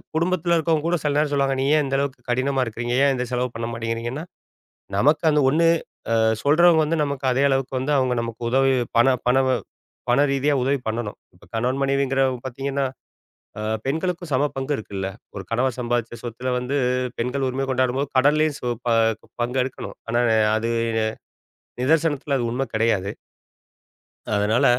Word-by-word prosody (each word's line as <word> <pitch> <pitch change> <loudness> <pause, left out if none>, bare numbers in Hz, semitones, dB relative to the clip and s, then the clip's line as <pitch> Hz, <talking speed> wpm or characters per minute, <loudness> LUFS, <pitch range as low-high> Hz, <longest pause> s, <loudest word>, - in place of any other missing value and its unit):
குடும்பத்துல 170 +1 +1
இருக்கவங்க 160 -1 +1
கூட 175 +1 +2
சில 145 -1 +1
நேரம் 150 -1 +1
சொல்லுவாங்க, 135 -1 +1
நீ - - +1
ஏன் 150 - +2
இந்த 135 0 -1
அளவுக்கு 140 -2 -2
கடினமா 130 +2 +1
இருக்குறீங்க? 120 +1 -3
ஏன் 140 - +3
இந்த 125 0 -2
செலவு 125 0 0
பண்ண 115 0 -3
மாட்டேங்கிறீங்கன்னா, 115 +4 -3 0.7
நமக்கு 150 +10 +3
அந்த 150 0 +3
1 165 +4 +3 0.5
அ - - +3 0.3
சொல்றவங்க 160 +3 +5
வந்து, 165 +2 0
நமக்கு 140 -2 -3
அதே 130 +2 +2
அளவுக்கு 135 -1 0
வந்து, 140 +3 -1
அவுங்க 130 -2 +1
நமக்கு 115 0 -6
உதவி 135 +1 +3 0.2
பண 120 +3 +5 0.2
பணவு 130 +1 +3 0.5
பண 120 - +4
ரீதியா 140 +2 +1
உதவி 135 +2 +1
பண்ணணும். 110 -1 -3 0.2
இப்ப 90 - -19
கணவன், 125 +4 0
மனைவிங்கிறவுங்க 135 -2 +1
பார்த்தீங்கன்னா, 135 +2 -2 0.8
அ - - -4 0.2
பெண்களுக்கும் 170 +3 -2
சம 135 +3 +3
பங்கு 135 +2 -1
இருக்குல்ல? 100 -3 -5 0.3
ஒரு 100 - -4
கணவன் 125 +1 0
சம்பாதிச்ச 120 -1 -2
சொத்துல 125 +2 -3
வந்து, 125 +3 -1 0.4
பெண்கள் 130 +3 -1
உரிமை 135 +1 -2
கொண்டாடும்போது, 130 +2 0
கடன்லேயும் 150 +2 +3
சு - - -5 0.2
ப - - +1 0.3
ப் - - -23
பங்கு 125 +2 0
எடுக்கணும். 130 - -7
ஆனா 120 +1 +2 0.2
அ - - +3 0.2
அது, 115 +1 -1 1.1
நிதர்சனத்துல 145 0 +1
அது 120 - -1
உண்மை 130 +3 -2
கிடையாது. 105 -3 +1 1.2
அதனால 105 +3 +2
135 Hz, 160 wpm, -23 LUFS, 120-145 Hz, 1.2 s, சொல்றவங்க